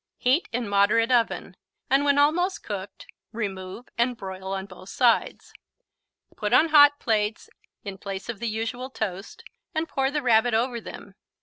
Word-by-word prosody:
Heat 260 +8 +1
in 235 -1 -2
moderate 205 +4 +3
oven, 235 -2 0 0.3
and 275 +2 +3
when 285 -1 +3
almost 340 +6 +2
cooked, 200 -2 -7 0.3
remove 200 0 -6
and 240 0 +1
broil 190 -2 -7
on 190 0 -3
both 185 0 -13
sides. 240 -3 +1 0.8
Put - - -2
on 325 - +5
hot 290 -1 +7
plates 215 -1 -1 0.3
in 195 -2 -7
place 195 -1 -6
of 235 -4 -5
the 235 0 -2
usual 225 +4 -4
toast 220 - -5 0.3
and 320 +1 -1
pour 270 -3 0
the 295 0 -2
Rabbit 235 -1 +3
over 235 +1 0
them. 200 -2 -10
230 Hz, 160 wpm, -25 LUFS, 200-265 Hz, 0.8 s, hot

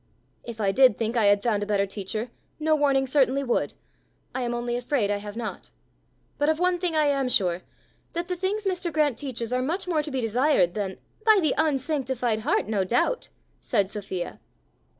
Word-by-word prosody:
"If 235 -2 -8
I 200 -2 +2
did 255 0 +5
think 225 +1 -2
I 225 -3 +3
had 200 0 +4
found 215 -4 +1
a 205 - -3
better 200 -1 +2
teacher, 215 +4 -4 0.3
no 310 0 +3
warning 275 -2 +2
certainly 270 0 +2
would; 245 -3 0 0.6
I 260 - -2
am 240 -1 -1
only 240 0 -2
afraid 245 -4 0
I 205 - +1
have 205 +1 -8
not. 235 -2 -5 0.7
But 290 +1 +3
of 315 - +2
one 360 +1 +1
thing 350 -2 -1
I 305 -1 +3
am 275 -3 +1
sure 180 -6 +1 0.5
that 340 +1 -3
the 365 - -2
things 390 +4 -2
Mr. 365 -2 -1
Grant 300 -4 +2
teaches 250 -4 -3
are 255 - +1
much 335 +9 -2
more 325 -4 +1
to 300 - -5
be 265 -2 -2
desired 240 - +2
than 195 -2 -3
" - - -32
"By 435 -1 +8
the 315 -5 +2
unsanctified 265 -6 0
heart, 215 - 0
no 210 -3 +1
doubt!" 245 - 0 0.3
said 200 -5 0
Sophia. 190 -4 -5
255 Hz, 200 wpm, -26 LUFS, 215-305 Hz, 0.7 s, By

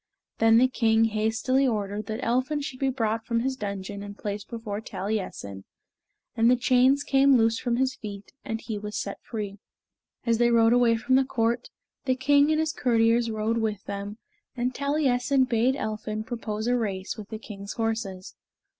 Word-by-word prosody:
Then 225 0 +6
the 255 +2 +6
king 225 -3 +3
hastily 225 +5 +1
ordered 205 -2 -2
that 220 +3 -4
Elphin 255 +5 +1
should 265 -2 -6
be 270 - +1
brought 225 -3 -1
from 230 0 0
his 265 +2 -1
dungeon 200 -2 -5
and 205 0 -8
placed 205 0 -5
before 220 -3 -5
Taliessin, 190 - -4 0.7
and 230 +1 +4
the 250 - +6
chains 255 +3 +3
came 275 -1 +4
loose 225 0 +2
from 240 -2 0
his 260 +1 +1
feet, 200 -2 -8
and 225 - -3
he 220 -2 -5
was 210 0 -5
set 200 - -4
free. 205 -3 -6 0.7
As 230 -1 +2
they 240 0 +4
rode 230 0 +5
away 240 -2 +4
from 260 +3 +2
the 270 - +4
court, 235 -2 -1 0.4
the 260 -1 +2
king 285 +3 +4
and 310 0 +2
his 315 -1 0
courtiers 230 -3 +2
rode 220 +1 -1
with 215 -3 -2
them, 200 +1 -6 0.4
and 245 +1 -1
Taliessin 275 -2 +1
bade 245 +1 +2
Elphin 215 -2 -4
propose 220 -2 -4
a 245 +1 +2
race 195 -5 -2
with 210 -2 -9
the 220 - -5
king's 200 -2 -8
horses. 220 -5 -3
225 Hz, 180 wpm, -26 LUFS, 215-255 Hz, 0.7 s, Then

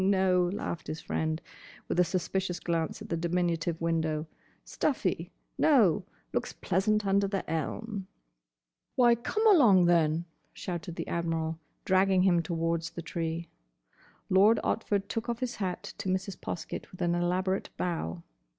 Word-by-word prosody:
"No, 185 -2 +3
no," 200 - -3
laughed 170 -5 -4
his 155 - -4
friend, 160 0 -2 0.5
with - - 0
a - - +7
suspicious 185 +1 -1
glance 165 -2 -2
at - - -11
the 170 - 0
diminutive 170 -1 0
window. 160 -2 0 0.4
"Stuffy. - - -1 0.3
No. - - +4 0.3
Looks - - -1
pleasant 210 +3 +1
under 200 0 +3
the 195 -1 -3
elm." 195 +6 -3 0.9
"Why, 240 -2 +6
come 335 - -1
along, 240 - +7
then!" 165 -1 +3 0.3
shouted 175 -2 -5
the - - -4
Admiral, 165 -1 -1 0.3
dragging 190 0 +4
him 175 -3 +4
towards 165 -1 -1
the 170 0 -7
tree. 165 0 -3 0.8
Lord 200 +5 +5
Otford 200 -3 0
took 225 +2 -3
off 235 - -1
his 250 -2 -3
hat 185 -4 -3
to 200 -2 -2
Mrs. 190 +1 -1
Poskett 170 - -5
with 185 0 -5
an 170 0 +2
elaborate 185 +2 0
bow. 85 - -2
180 Hz, 145 wpm, -29 LUFS, 165-195 Hz, 0.9 s, a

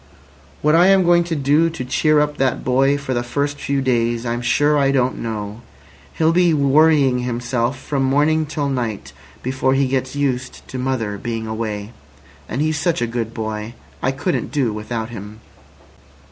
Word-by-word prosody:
"What 150 +1 +4
I 175 +3 +6
am 195 -1 +5
going 175 0 +4
to 170 -1 -2
do 145 +3 +3
to 160 -6 -6
cheer 155 +4 +2
up 150 0 -1
that 130 -2 0
boy 135 +2 +2
for 140 -2 -4
the 120 - 0
first 140 +4 -2
few 140 -1 -1
days 120 -2 0
I'm 120 0 -2
sure 145 +5 +2
I 140 -2 +3
don't 130 -2 +1
know. 110 -1 -5 0.5
He'll 160 0 +3
be 175 -1 +3
worrying 140 -2 +4
himself 120 +1 -1
from 135 +1 -3
morning 150 +4 +2
till 145 -2 -2
night 120 -6 -3 0.3
before 130 +1 0
he 135 0 +2
gets 130 0 -2
used 130 -3 -2
to 130 - -5
mother 115 -6 -2
being 115 -1 -4
away. 110 -1 -4 0.6
And 140 - -1
he's 155 -1 0
such 170 +1 0
a 120 - +1
good 115 -1 -3
boy. 110 +1 -4 0.3
I 130 - +1
couldn't 140 +7 -2
do 130 -7 0
without 110 +1 -4
him." 105 -1 -9
130 Hz, 175 wpm, -20 LUFS, 120-145 Hz, 0.6 s, I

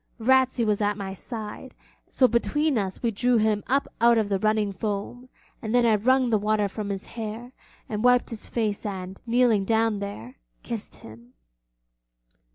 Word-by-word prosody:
Ratsey 260 0 +3
was 210 -1 +1
at 205 0 +1
my 195 -2 -5
side, 220 +4 -7 0.3
and - - -29
so 255 - +5
between 295 +5 +1
us 195 -2 -2
we 235 - +1
drew 245 +3 +2
him 215 -1 +1
up 275 +3 +1
out 235 0 +6
of 215 -2 +1
the 195 -1 0
running 215 0 +1
foam, 210 +5 -5 0.3
and 220 +1 -2
then 245 -1 +4
I 225 - +4
wrung 250 +4 +2
the 215 - +3
water 210 0 +1
from 205 +1 -5
his 195 -1 -3
hair, 230 +2 -7 0.4
and 215 0 -3
wiped 250 0 +4
his 225 - -5
face 215 -4 -2
and, 190 -2 -6
kneeling 235 -3 +3
down 225 0 +1
there, 130 - -7 0.3
kissed 230 -3 -5
him. 115 +3 -15
220 Hz, 175 wpm, -25 LUFS, 200-240 Hz, 0.4 s, out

